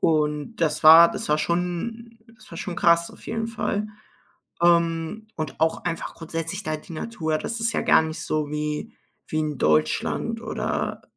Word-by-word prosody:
Und 150 Hz, +5 st, 0 dB
das 160 Hz, -5 st, 0 dB
war 165 Hz, +2 st, +10 dB
das -, -, -5 dB
war 150 Hz, 0 st, +3 dB
schon 180 Hz, +9 st, -3 dB, 0.2 s
das 215 Hz, -, -18 dB
war -, -, -8 dB
schon 180 Hz, -3 st, -5 dB
krass 170 Hz, 0 st, +3 dB
auf -, -, -16 dB
jeden 225 Hz, 0 st, -2 dB
Fall. 215 Hz, -2 st, -2 dB, 0.7 s
Ähm, 170 Hz, +4 st, +2 dB
und 155 Hz, -3 st, -5 dB
auch 160 Hz, 0 st, +1 dB
einfach 165 Hz, -2 st, -3 dB
grundsätzlich 165 Hz, +3 st, -5 dB
da 155 Hz, -2 st, -1 dB
die 155 Hz, -, -13 dB
Natur, 160 Hz, -4 st, -2 dB
das 230 Hz, 0 st, -4 dB
ist 230 Hz, 0 st, 0 dB
ja -, -, 0 dB
gar -, -, +5 dB
nicht 160 Hz, 0 st, -5 dB
so 155 Hz, -1 st, -1 dB
wie 150 Hz, 0 st, -3 dB, 0.4 s
wie 155 Hz, -, -2 dB
in 150 Hz, -3 st, -3 dB
Deutschland 75 Hz, -3 st, +1 dB
oder -, -, -3 dB
165 Hz, 170 wpm, -24 LUFS, 155-200 Hz, 0.7 s, war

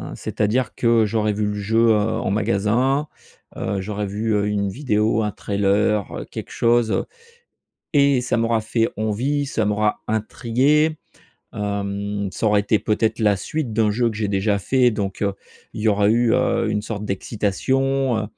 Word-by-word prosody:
c'est-à-dire 110 Hz, +4 st, -1 dB
que 115 Hz, -2 st, +3 dB
j'aurais 105 Hz, 0 st, 0 dB
vu 105 Hz, 0 st, -1 dB
le 105 Hz, -, -2 dB
jeu, 110 Hz, +3 st, +2 dB
heu, -, -, +6 dB
en 105 Hz, -2 st, 0 dB
magasin 115 Hz, +8 st, +1 dB, 0.5 s
heu, 95 Hz, 0 st, -2 dB
j'aurais 105 Hz, +1 st, -3 dB
vu, 105 Hz, +2 st, -2 dB
heu, 105 Hz, 0 st, +1 dB
une 100 Hz, -1 st, 0 dB
vidéo, 110 Hz, -2 st, 0 dB
un 105 Hz, -, -1 dB
trailer, 100 Hz, +1 st, 0 dB
quelque -, -, -7 dB
chose. 120 Hz, -1 st, +2 dB, 0.9 s
Et 140 Hz, -3 st, +4 dB
ça 125 Hz, -, -1 dB
m'aura 115 Hz, -1 st, +1 dB
fait 115 Hz, +1 st, 0 dB
envie, 125 Hz, +7 st, -1 dB
ça 110 Hz, -4 st, -1 dB
m'aura 105 Hz, 0 st, 0 dB
intrigué, 130 Hz, +8 st, +1 dB, 0.6 s
hem, 100 Hz, 0 st, -3 dB
ça -, -, -3 dB
aura 105 Hz, -1 st, +4 dB
été, 105 Hz, +1 st, +2 dB
peut 105 Hz, -, 0 dB
être, 110 Hz, +1 st, 0 dB
la 105 Hz, -2 st, +3 dB
suite 135 Hz, 0 st, -3 dB
d'un 110 Hz, -1 st, +2 dB
jeu 120 Hz, +2 st, +1 dB
que 110 Hz, -, -7 dB
j'ai 105 Hz, -2 st, -1 dB
déjà 100 Hz, +1 st, 0 dB
fait. 125 Hz, +3 st, +2 dB
Donc, 100 Hz, -1 st, -3 dB, 0.5 s
il -, -, -6 dB
y 110 Hz, -, +1 dB
aura 100 Hz, 0 st, +3 dB
eu, 120 Hz, +1 st, +3 dB
heu, 115 Hz, -3 st, +1 dB
une 105 Hz, -1 st, -1 dB
sorte 105 Hz, -1 st, -5 dB
d'excitation, 125 Hz, +6 st, 0 dB
heu, 110 Hz, -, -1 dB
110 Hz, 165 wpm, -21 LUFS, 105-120 Hz, 0.9 s, heu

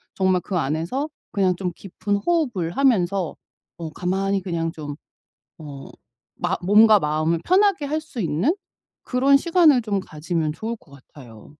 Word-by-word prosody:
정말 185 Hz, -1 st, +2 dB
그 185 Hz, -, -3 dB
안에서 165 Hz, -, -2 dB, 0.2 s
그냥 190 Hz, -3 st, +2 dB
좀 180 Hz, -2 st, -2 dB
깊은 205 Hz, +1 st, -3 dB
호흡을 230 Hz, -, 0 dB
하면서 195 Hz, -, +1 dB, 0.4 s
어 165 Hz, -2 st, -5 dB
가만히 195 Hz, +3 st, -1 dB
그냥 165 Hz, -3 st, -2 dB
좀 150 Hz, -3 st, -7 dB, 0.6 s
어 140 Hz, -3 st, -9 dB, 0.5 s
마 175 Hz, +2 st, -1 dB
몸과 210 Hz, +3 st, +6 dB
마음을 155 Hz, +1 st, 0 dB
편하게 380 Hz, -3 st, +3 dB
할 305 Hz, +2 st, -2 dB
수 295 Hz, -5 st, -9 dB
있는 170 Hz, -, +1 dB, 0.5 s
그런 270 Hz, +2 st, +4 dB
시간을 325 Hz, -5 st, +4 dB
좀 205 Hz, -3 st, -1 dB
가지면 155 Hz, -2 st, -3 dB
좋을 220 Hz, +8 st, -4 dB
것 160 Hz, -, -24 dB
같아요. 130 Hz, -5 st, -15 dB
190 Hz, 275 characters per minute, -23 LUFS, 165-250 Hz, 0.6 s, 몸과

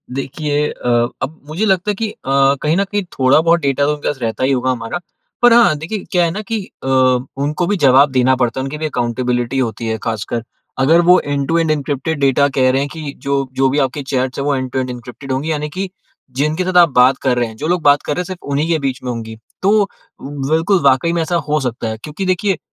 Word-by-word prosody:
देखिए 145 Hz, +2 st, -1 dB
अ, 125 Hz, -, -5 dB, 0.3 s
अब 145 Hz, +4 st, -4 dB
मुझे 170 Hz, +8 st, -1 dB
लगता 195 Hz, 0 st, +1 dB
है -, -, -4 dB
कि 220 Hz, +1 st, -2 dB
अ, -, -, -13 dB, 0.5 s
कहीं 155 Hz, +3 st, +1 dB
न 200 Hz, -, +3 dB
कहीं 205 Hz, +1 st, -2 dB
थोड़ा-बहुत 155 Hz, +6 st, +3 dB
डेटा 140 Hz, 0 st, +1 dB
तो 150 Hz, -, +1 dB
उनके 145 Hz, -, -6 dB
पास 140 Hz, -, -2 dB
रहता 115 Hz, +2 st, -2 dB
ही 130 Hz, -, +2 dB
होगा 130 Hz, -1 st, +1 dB
हमारा। 120 Hz, +7 st, -4 dB, 0.4 s
पर 240 Hz, -1 st, +7 dB
हाँ, 235 Hz, -9 st, +5 dB
देखिए 180 Hz, +7 st, -5 dB
क्या 180 Hz, -1 st, +3 dB
है 165 Hz, -, -1 dB
ना 205 Hz, -, -4 dB
कि 225 Hz, -, 0 dB, 0.2 s
अ, 135 Hz, -, -4 dB, 0.6 s
उनको 150 Hz, +4 st, -1 dB
भी 205 Hz, -, +1 dB
जवाब 135 Hz, +1 st, +6 dB
देना 130 Hz, 0 st, +3 dB
पड़ता 125 Hz, 0 st, -1 dB
है, -, -, -2 dB
उनकी 135 Hz, +3 st, -5 dB
भी 155 Hz, -, -3 dB
अकाउंटेबिलिटी 120 Hz, -1 st, -1 dB
होती 115 Hz, -2 st, -2 dB
है। 110 Hz, 0 st, -1 dB
ख़ासकर 115 Hz, +1 st, -3 dB, 0.4 s
अगर 160 Hz, +6 st, +5 dB
वो 180 Hz, +1 st, +6 dB
एंड-टू-एंड 150 Hz, +3 st, 0 dB
एन्क्रिप्टेड 145 Hz, +1 st, -2 dB
डाटा 140 Hz, +1 st, +4 dB
कह 130 Hz, -1 st, +4 dB
रहे 135 Hz, +1 st, +1 dB
हैं 140 Hz, -, -2 dB
कि 155 Hz, -4 st, -6 dB
जो 140 Hz, 0 st, +1 dB, 0.2 s
जो 135 Hz, -, +4 dB
भी 140 Hz, +3 st, 0 dB
आपके 145 Hz, +3 st, -5 dB
चैट्स 130 Hz, 0 st, -1 dB
हैं, 140 Hz, -, -2 dB
वो 145 Hz, -1 st, +1 dB
एंड-टू-एंड 130 Hz, 0 st, -2 dB
एन्क्रिप्टेड 125 Hz, +2 st, -8 dB
होंगी, 140 Hz, +5 st, -1 dB
यानी 150 Hz, -1 st, -2 dB
कि 190 Hz, 0 st, -2 dB, 0.5 s
जिनके 155 Hz, +4 st, 0 dB
साथ 185 Hz, 0 st, 0 dB
आप 170 Hz, -2 st, +7 dB
बात 130 Hz, +1 st, +5 dB
कर 125 Hz, -1 st, +2 dB
रहे 120 Hz, -1 st, +1 dB
हैं, 110 Hz, -, -11 dB
जो 150 Hz, -, -3 dB
लोग 175 Hz, +1 st, +1 dB
बात 145 Hz, 0 st, +5 dB
कर -, -, -1 dB
रहे -, -, -4 dB
हैं, -, -, -5 dB
सिर्फ 185 Hz, -1 st, -8 dB
उन्हीं 145 Hz, +3 st, 0 dB
के 165 Hz, -2 st, +2 dB
बीच 135 Hz, -2 st, -2 dB
में 125 Hz, -, -2 dB
होंगी। 110 Hz, -1 st, -6 dB, 0.2 s
तो 200 Hz, +1 st, +3 dB, 0.3 s
बिल्कुल, 160 Hz, +7 st, 0 dB
वाकई 140 Hz, +5 st, +3 dB
में 170 Hz, -, 0 dB
ऐसा 170 Hz, +2 st, -1 dB
हो 150 Hz, 0 st, +2 dB
सकता 120 Hz, -2 st, -3 dB
है। 110 Hz, -, -4 dB
क्योंकि 155 Hz, +6 st, -5 dB
देखिए 185 Hz, +2 st, +1 dB
कि 165 Hz, -, -9 dB
145 Hz, 240 wpm, -17 LUFS, 130-170 Hz, 0.6 s, पर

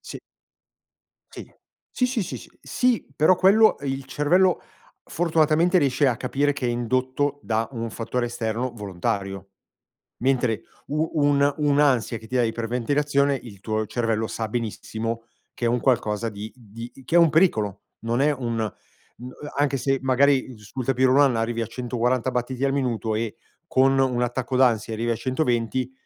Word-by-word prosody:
sì. -, -, -8 dB, 1.1 s
Sì. -, -, -9 dB, 0.4 s
Sì, 250 Hz, -, +1 dB
sì, 250 Hz, -3 st, -1 dB
sì. -, -, -7 dB
Sì 250 Hz, -3 st, 0 dB
però 155 Hz, +6 st, +5 dB
quello, 210 Hz, +4 st, +5 dB
ehm, 140 Hz, -1 st, -3 dB
il 135 Hz, 0 st, -4 dB
cervello 170 Hz, +7 st, +2 dB, 0.4 s
fortunatamente 165 Hz, +2 st, +2 dB
riesce 140 Hz, -2 st, +2 dB
a 125 Hz, -3 st, +2 dB
capire 140 Hz, +4 st, 0 dB
che 140 Hz, -3 st, -3 dB
è -, -, +1 dB
indotto 130 Hz, +4 st, -1 dB
da 115 Hz, 0 st, -1 dB
un 115 Hz, -2 st, -4 dB
fattore 120 Hz, +2 st, -2 dB
esterno 120 Hz, +1 st, -3 dB
volontario, 95 Hz, -1 st, -4 dB, 0.7 s
mentre 125 Hz, -3 st, +1 dB, 0.3 s
u 155 Hz, +2 st, 0 dB
un 145 Hz, -2 st, +3 dB
un'ansia 140 Hz, -6 st, +2 dB
che 110 Hz, -, -13 dB
ti 130 Hz, -, -2 dB
dà 125 Hz, -, +4 dB
iper 115 Hz, 0 st, -2 dB
ventilazione, 140 Hz, +3 st, +1 dB
il 110 Hz, -7 st, -11 dB
tuo 110 Hz, +1 st, -2 dB
cervello 115 Hz, -1 st, -1 dB
sa 110 Hz, 0 st, -4 dB
benissimo 115 Hz, 0 st, -4 dB, 0.3 s
che -, -, -5 dB
è -, -, +3 dB
un 120 Hz, +1 st, +1 dB
qualcosa 115 Hz, -4 st, +1 dB
di 105 Hz, +1 st, -8 dB
di 115 Hz, 0 st, -10 dB
che 165 Hz, -, +1 dB
è -, -, +8 dB
un 170 Hz, -2 st, +6 dB
pericolo, 110 Hz, -, +2 dB, 0.2 s
non 115 Hz, +2 st, -1 dB
è 150 Hz, +2 st, +3 dB
un 120 Hz, -4 st, -3 dB, 0.6 s
mhmm, 125 Hz, +1 st, -8 dB, 0.3 s
anche 145 Hz, -1 st, +1 dB
se 135 Hz, +2 st, 0 dB
magari 130 Hz, -1 st, +2 dB
sul 120 Hz, +5 st, -7 dB
tapis 130 Hz, +1 st, +2 dB
roulant 135 Hz, -1 st, +4 dB
arrivi 115 Hz, +1 st, -1 dB
a 115 Hz, -, -2 dB
140 125 Hz, +1 st, -1 dB
battiti 125 Hz, +2 st, -2 dB
al 135 Hz, -, +2 dB
minuto, 120 Hz, -5 st, -1 dB
e 110 Hz, -1 st, -3 dB, 0.3 s
con 135 Hz, -1 st, +3 dB
un 130 Hz, -2 st, +1 dB
attacco 125 Hz, +1 st, -2 dB
d'ansia 115 Hz, -4 st, +2 dB
arrivi 115 Hz, +2 st, -2 dB
a 115 Hz, -, +1 dB
120, 130 Hz, -2 st, -1 dB
125 Hz, 165 wpm, -24 LUFS, 115-140 Hz, 1.1 s, è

